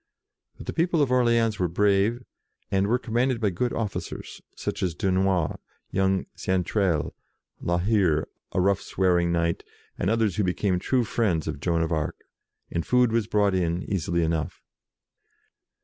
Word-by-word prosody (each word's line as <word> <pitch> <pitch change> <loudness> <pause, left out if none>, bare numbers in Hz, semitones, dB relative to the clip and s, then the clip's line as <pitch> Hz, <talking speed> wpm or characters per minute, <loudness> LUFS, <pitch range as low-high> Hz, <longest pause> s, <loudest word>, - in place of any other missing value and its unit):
But - - -10
the - - -4
people 165 -2 +2
of 130 - -1
Orleans 115 -3 +3
were 90 - +2
brave, 105 +6 +2 0.5
and 95 0 +2
were 120 +4 +3
commanded 125 +1 0
by 105 -4 +1
good 120 +8 -1
officers, 110 -4 -5
such - - -4
as 90 -4 -1
Dunois, 95 -3 +1 0.3
young 95 0 +1
Xaintrailles, 95 -3 0 0.5
La 85 0 0
Hire, 90 -5 +2 0.2
a - - 0
rough, 100 +1 +2
swearing 90 -2 +1
knight, 85 0 0 0.4
and 95 - +1
others 110 -4 +1
who 105 - +2
became 90 0 0
true 125 +6 +1
friends 100 -9 0
of 70 - -3
Joan 85 +1 +1
of 80 - -2
Arc, 80 -2 -1 0.5
and 85 - -1
food 125 +2 +3
was 115 -2 +1
brought 105 -2 +2
in 90 -1 0
easily 85 -2 -1
enough. 80 -2 -2
95 Hz, 155 wpm, -26 LUFS, 85-115 Hz, 0.5 s, Orleans